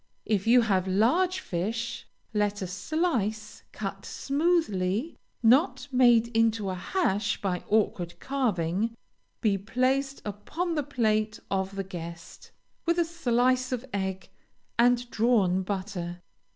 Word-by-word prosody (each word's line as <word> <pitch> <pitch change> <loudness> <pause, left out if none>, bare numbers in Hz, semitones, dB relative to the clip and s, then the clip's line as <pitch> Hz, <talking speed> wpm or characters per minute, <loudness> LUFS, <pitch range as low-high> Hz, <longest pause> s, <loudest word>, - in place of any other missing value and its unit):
If 210 -1 0
you 245 +1 +7
have 190 -5 +1
large 325 - +2
fish, 225 - -3 0.3
let 205 -1 0
a - - -2
slice, 220 - -2
cut 195 -1 -5
smoothly, 275 - 0 0.3
not 265 +11 +4
made 240 -3 +5
into 225 -3 +2
a - - -2
hash 205 - 0
by 180 -3 -2
awkward 190 -5 0
carving, 225 -5 -1 0.5
be 200 -3 +2
placed 260 +6 0
upon 310 - -3
the 305 - +1
plate 220 -6 0
of 190 0 -1
the 195 - -2
guest, 170 -2 -9 0.4
with 340 0 +3
a 345 - +3
slice 255 -5 +1
of 250 0 -2
egg, 190 -1 -3 0.5
and 245 +1 +4
drawn 210 -6 +3
butter. 185 -3 -4
220 Hz, 125 wpm, -28 LUFS, 195-255 Hz, 0.5 s, you